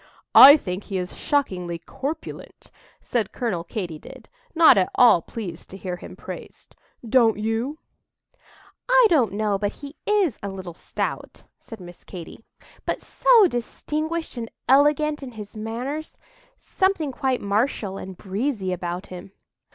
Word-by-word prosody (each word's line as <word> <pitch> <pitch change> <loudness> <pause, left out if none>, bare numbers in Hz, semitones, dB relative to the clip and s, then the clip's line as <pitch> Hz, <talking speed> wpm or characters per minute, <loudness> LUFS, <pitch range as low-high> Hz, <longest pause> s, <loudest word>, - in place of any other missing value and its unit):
"I 285 +3 +11
think 185 -6 -5
he 195 - -3
is 180 -1 -4
shockingly 180 -12 -1
corpulent," 275 - -7 0.3
said 225 -5 -2
Colonel 200 -9 -2
Katy 170 -4 -5
did, - - -13 0.3
not 325 0 +7
at 190 -2 +2
all 235 -9 +6
pleased 180 -4 -8
to 190 - -9
hear 180 -2 -5
him - - -11
praised; - - -10 0.3
"don't 225 -2 +4
you?" 225 +7 -2 1.1
"I - - +6
don't 255 - +3
know 205 -1 0
but 205 0 -1
he 285 +1 -11
is 400 - +2
a 200 - -4
little 190 -3 -7
stout," - - -5 0.2
said 225 - -11
Miss 175 -1 -12
Katy; 180 +4 -10 0.4
"but - - -2
so 465 -5 +4
distinguished 310 +3 -3
and 230 -1 -5 0.2
elegant 295 +2 +3
in 260 -3 -8
his 210 -1 -10
manners—something 310 - -4
quite 260 -1 -1
martial 200 -1 -1
and 185 -1 -8
breezy 200 -1 -2
about 175 0 -4
him." 185 +1 -10
225 Hz, 140 wpm, -23 LUFS, 190-290 Hz, 1.1 s, I